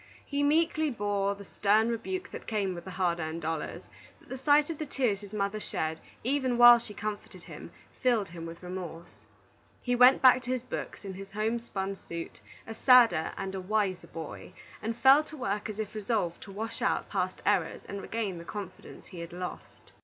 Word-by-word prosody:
He 285 0 -1
meekly 315 +1 +2
bore 205 -4 -1
the 200 0 -11
stern 215 +4 +2
rebuke 370 - -3
that - - -8
came 205 -4 0
with 170 - -8
the - - -7
hard 175 -2 +1
earned 160 0 -4
dollars, 160 +1 -3 0.4
but - - -22
the 260 - -5
sight 295 +3 +4
of 315 - -7
the 310 - -2
tears 240 -8 0
his 200 -1 -11
mother 205 0 -1
shed, 160 -5 -3 0.2
even 260 -1 +1
while 240 0 +10
she 215 -3 -10
comforted 210 0 -6
him, - - -10 0.3
filled 235 -6 +2
him 165 -1 -7
with 165 +2 -10
remorse. 180 -2 -8 0.5
He 245 -1 0
went 250 +2 +7
back 255 -1 +7
to 250 - -8
his 255 -2 -1
books, 235 - -6
in 190 0 -6
a - - -4
homespun 210 -1 -3
suit, 170 0 -6 0.3
a 225 - -6
sadder 230 -9 +5
and 190 0 -4
a 190 - -4
wiser 190 -2 -1
boy, 160 -2 -8 0.3
and 225 +1 -3
fell 270 +4 +7
to 310 0 -11
work 210 -4 -2
as 210 - -6
if 215 -2 -4
resolved 210 -5 -1
to 200 - -10
wash 220 +3 -5
out - - +1
past - - -2
errors - - +1
and 200 0 -5
regain 205 -6 -3
the - - -8
confidence 195 +1 -8
he 180 - -9
had 170 0 -7
lost. 180 +1 -8
210 Hz, 200 wpm, -29 LUFS, 185-245 Hz, 0.5 s, while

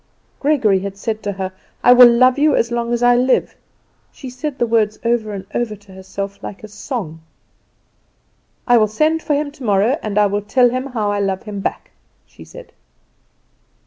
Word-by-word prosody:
Gregory 255 -10 +2
had 195 +1 -6
said 220 +1 -4
to 205 -1 -3
her, 190 -1 -5 0.3
"I 245 - +7
will 250 -1 +9
love 255 +3 +3
you 300 -1 +3
as 235 - 0
long 235 0 -2
as 240 0 -1
I 245 0 +5
live." 255 +1 +1 0.6
She 260 -3 -10
said 275 +2 -5
the 240 - +1
words 220 -2 +1
over 230 -2 0
and 195 -2 -7
over 235 -3 -2
to 205 -1 -19
herself 195 +1 -7
like 200 - -9
a - - -8
song. 205 - -6 1.4
"I 245 -2 +4
will 215 - +3
send 310 +9 0
for 295 - -1
him 290 0 -2
tomorrow, 235 0 0
and 210 -1 -4
I 210 - +5
will 205 +1 -1
tell 245 +4 +2
him 255 +2 -3
how 220 -6 -2
I 205 - -1
love 195 -1 -2
him 210 -2 -6
back," 195 - -5 0.3
she - - -16
said. - - -14
230 Hz, 190 wpm, -18 LUFS, 205-255 Hz, 1.4 s, will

